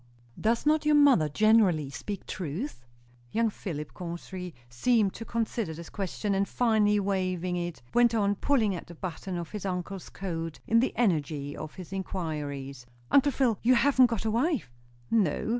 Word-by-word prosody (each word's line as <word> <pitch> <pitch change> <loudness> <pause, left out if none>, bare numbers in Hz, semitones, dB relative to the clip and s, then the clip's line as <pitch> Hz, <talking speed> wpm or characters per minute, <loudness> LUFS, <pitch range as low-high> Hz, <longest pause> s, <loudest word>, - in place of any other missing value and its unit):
"Does 230 +4 +1
not 305 +1 +3
your 300 0 +4
mother 270 - +5
generally 185 -6 +3
speak 200 +8 -6
truth?" 170 - -5 0.4
Young 230 -1 +1
Philip 150 -7 -6
Chauncey 180 0 -6
seemed 200 - +2
to 225 - -7
consider 225 -7 -2
this 170 +1 -9
question; 200 +1 -2
and 195 +1 +1
finally 215 -3 +3
waiving 185 -2 -1
it, 175 -7 -4
went 240 -1 +4
on 205 -2 +2
pulling 220 -2 +1
at 175 - -7
a 170 - -9
button 180 +2 -5
of 170 -1 -6
his 210 -3 -5
uncle's 185 0 -4
coat 165 -4 -5
in 230 - +4
the 255 - 0
energy 150 -9 0
of 155 -1 -7
his 185 -1 -9
inquiries. 145 -8 -4 0.2
"Uncle 285 +1 +5
Phil, 250 -6 +1
you 250 +2 +5
haven't 260 0 +5
got 230 -3 -3
a 220 - +1
wife?" 250 - 0 0.4
"No." 210 -4 +1
195 Hz, 165 wpm, -28 LUFS, 165-230 Hz, 0.4 s, mother